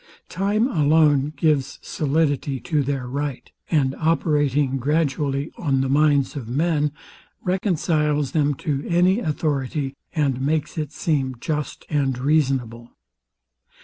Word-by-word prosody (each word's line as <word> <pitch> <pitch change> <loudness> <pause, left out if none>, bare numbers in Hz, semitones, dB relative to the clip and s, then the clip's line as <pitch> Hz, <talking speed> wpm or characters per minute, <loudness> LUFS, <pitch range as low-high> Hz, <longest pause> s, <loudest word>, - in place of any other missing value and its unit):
Time 205 +5 +1
alone 150 - +3
gives 150 -4 +1
solidity 145 -2 0
to 155 0 0
their 135 -2 -2
right; 140 0 -4 0.2
and 135 -5 +2
operating 145 -4 +1
gradually 145 0 0
on 135 -5 +1
the 135 - -1
minds 145 -1 +3
of 125 -5 -6
men, 150 +2 +1 0.5
reconciles 155 - 0
them 145 -2 +1
to 140 0 -2
any 180 +4 +3
authority, 145 - -2 0.2
and 140 -5 +1
makes 150 +2 -1
it 150 -3 -3
seem 140 -5 -1
just 150 +2 -4
and 135 -4 0
reasonable. 130 -5 0
145 Hz, 115 wpm, -22 LUFS, 135-155 Hz, 0.5 s, alone